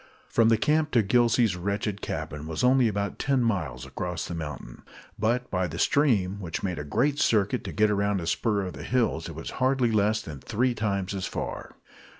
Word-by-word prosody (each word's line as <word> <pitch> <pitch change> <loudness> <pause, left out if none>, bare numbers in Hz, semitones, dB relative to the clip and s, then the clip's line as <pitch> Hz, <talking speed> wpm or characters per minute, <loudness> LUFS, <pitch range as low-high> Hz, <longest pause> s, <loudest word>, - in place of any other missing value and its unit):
From 115 -1 +4
the 115 - +4
camp 150 +5 +2
to 115 -3 +4
Gillsey's 115 -1 +3
wretched 100 +2 -2
cabin 75 -1 -5
was 80 +5 -3
only 125 -1 +5
about 100 -2 -2
ten 135 -3 +1
miles 80 - -1
across 85 +5 -4
the - - -5
mountain, 75 -7 -7 0.4
but 120 +4 +1
by 90 -1 0
the 85 +1 -7
stream, 100 -8 +2
which 85 -4 -5
made 90 -4 -2
a - - -4
great 140 - 0
circuit 105 -3 +2
to - - -4
get 105 0 +2
around 100 -1 +1
a 85 - -5
spur 105 +4 0
of 90 - -5
the - - -9
hills, 115 -10 0
it 80 - -8
was 80 - -6
hardly 130 -2 +2
less 110 0 +2
than 75 -4 -8
three 120 - 0
times 100 -4 -2
as 95 -1 -3
far. - - -5
100 Hz, 200 wpm, -27 LUFS, 90-120 Hz, 0.4 s, only